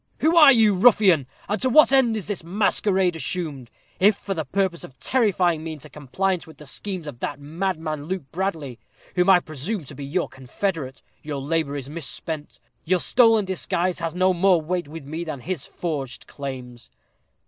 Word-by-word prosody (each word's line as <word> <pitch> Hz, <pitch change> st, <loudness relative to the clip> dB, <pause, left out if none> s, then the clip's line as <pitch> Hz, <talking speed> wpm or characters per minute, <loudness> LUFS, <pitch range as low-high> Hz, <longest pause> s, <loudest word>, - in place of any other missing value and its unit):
"Who 320 Hz, +2 st, +3 dB
are 305 Hz, -4 st, +9 dB
you, 220 Hz, -5 st, +5 dB
ruffian, 190 Hz, -, +5 dB, 0.2 s
and 210 Hz, -, -2 dB
to 260 Hz, -, +2 dB
what 305 Hz, +2 st, +6 dB
end 240 Hz, -5 st, +4 dB
is 210 Hz, -, -5 dB
this 205 Hz, -5 st, -4 dB
masquerade 190 Hz, 0 st, +1 dB
assumed? 150 Hz, -4 st, -3 dB, 0.3 s
If 205 Hz, +2 st, +5 dB
for 195 Hz, -, -4 dB
the 160 Hz, -4 st, -3 dB
purpose 185 Hz, +3 st, -1 dB
of 130 Hz, -, -12 dB
terrifying 185 Hz, -, +1 dB
me 160 Hz, -1 st, -4 dB
into 150 Hz, -, -12 dB
compliance 180 Hz, +6 st, -2 dB
with 160 Hz, -, -14 dB
the 150 Hz, -, -12 dB
schemes 185 Hz, +4 st, -5 dB
of 140 Hz, -6 st, -8 dB
that 145 Hz, -, -4 dB
madman, 155 Hz, -1 st, -3 dB
Luke 185 Hz, 0 st, -3 dB
Bradley, 160 Hz, -9 st, -3 dB, 0.3 s
whom 180 Hz, +1 st, +2 dB
I 185 Hz, -2 st, +7 dB
presume 155 Hz, +4 st, -5 dB
to 140 Hz, -, -10 dB
be 145 Hz, 0 st, -8 dB
your 160 Hz, +6 st, -1 dB
confederate, 135 Hz, +2 st, -4 dB, 0.2 s
your 150 Hz, -2 st, -5 dB
labor 145 Hz, 0 st, -1 dB
is 135 Hz, -2 st, -5 dB
misspent 155 Hz, 0 st, -6 dB, 0.2 s
your 180 Hz, +2 st, +1 dB
stolen 225 Hz, 0 st, +4 dB
disguise 185 Hz, -1 st, -1 dB
has 165 Hz, 0 st, -3 dB
no 185 Hz, +1 st, +3 dB
more 180 Hz, 0 st, +4 dB
weight 175 Hz, +1 st, -3 dB
with 155 Hz, -1 st, -9 dB
me 160 Hz, +4 st, -5 dB
than 155 Hz, -6 st, -6 dB
his 170 Hz, -1 st, -4 dB
forged 145 Hz, -7 st, -4 dB
claims." 125 Hz, -4 st, -8 dB
170 Hz, 180 wpm, -23 LUFS, 145-195 Hz, 0.3 s, are